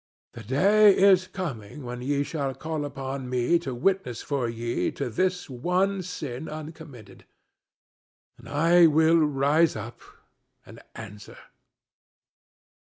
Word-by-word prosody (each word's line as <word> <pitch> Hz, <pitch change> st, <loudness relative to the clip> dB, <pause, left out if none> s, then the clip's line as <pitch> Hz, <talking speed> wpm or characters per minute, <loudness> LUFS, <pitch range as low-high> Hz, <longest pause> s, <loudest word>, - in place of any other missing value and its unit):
The 115 Hz, -, -9 dB
day 195 Hz, -, +4 dB
is 190 Hz, -1 st, +5 dB
coming 145 Hz, -, -6 dB
when 125 Hz, 0 st, -6 dB
ye 140 Hz, +2 st, 0 dB
shall 140 Hz, -3 st, -4 dB
call 155 Hz, -2 st, -4 dB
upon 135 Hz, -2 st, -6 dB
me 125 Hz, +7 st, +1 dB
to 135 Hz, -7 st, -5 dB
witness 125 Hz, -4 st, -1 dB
for 135 Hz, -5 st, -2 dB
ye 115 Hz, +1 st, -2 dB
to 135 Hz, -4 st, -4 dB
this 180 Hz, +8 st, -1 dB
one 180 Hz, +9 st, -1 dB
sin 155 Hz, -6 st, -6 dB
uncommitted, 155 Hz, -8 st, -10 dB, 1.1 s
and -, -, -13 dB
I 165 Hz, +4 st, +5 dB
will 160 Hz, +2 st, +4 dB
rise 150 Hz, +2 st, +2 dB
up 110 Hz, +2 st, -8 dB, 0.6 s
and -, -, -13 dB, 0.2 s
answer." 105 Hz, -2 st, -11 dB
145 Hz, 120 wpm, -26 LUFS, 125-170 Hz, 1.1 s, is